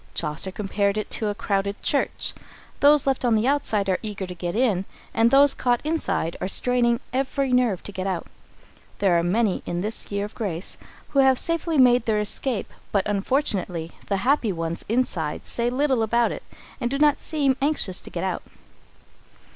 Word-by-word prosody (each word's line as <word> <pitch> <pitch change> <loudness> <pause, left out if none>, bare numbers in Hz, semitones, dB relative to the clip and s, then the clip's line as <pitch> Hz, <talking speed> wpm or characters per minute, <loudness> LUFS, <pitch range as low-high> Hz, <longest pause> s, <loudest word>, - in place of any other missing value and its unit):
Chaucer 160 +4 +1
compared 200 +1 -1
it 215 - -4
to 220 - 0
a 205 - -2
crowded 200 0 -1
church. 280 - 0 0.5
Those 290 0 +5
left 270 -2 0
on 240 -2 +3
the 215 +1 +1
outside 255 -8 +1
are 185 -1 +1
eager 205 -3 -4
to 180 - -7
get 175 0 -4
in, 215 -6 +1 0.3
and 225 +1 +4
those 280 +2 +6
caught 245 -1 +1
inside 305 - -1
are - - -1
straining 240 +2 +2
every 270 0 0
nerve 245 -7 +2
to - - -7
get 190 -1 -4
out. 180 -3 -2 0.7
There 190 -4 +3
are - - +1
many, 195 +3 +1
in 175 0 -2
this 215 +2 0
year 200 0 -1
of 210 - -10
grace, 185 -5 -3 0.3
who 275 - +1
have 265 -1 +5
safely 335 0 0
made 245 -3 +5
their 215 -1 +2
escape, 210 +2 -2 0.2
but, 200 -2 +1
unfortunately, 195 - -1 0.2
the 200 - 0
happy 260 -5 +2
ones 165 -1 -4
inside 195 -10 -1
say 235 0 -1
little 260 -1 +1
about 235 +2 +2
it, - - -6 0.4
and 240 - -1
do 275 - -1
not 295 0 +4
seem 285 -4 +1
anxious 275 -10 0
to - - -10
get - - -4
out. - - -2
220 Hz, 185 wpm, -24 LUFS, 195-260 Hz, 0.7 s, those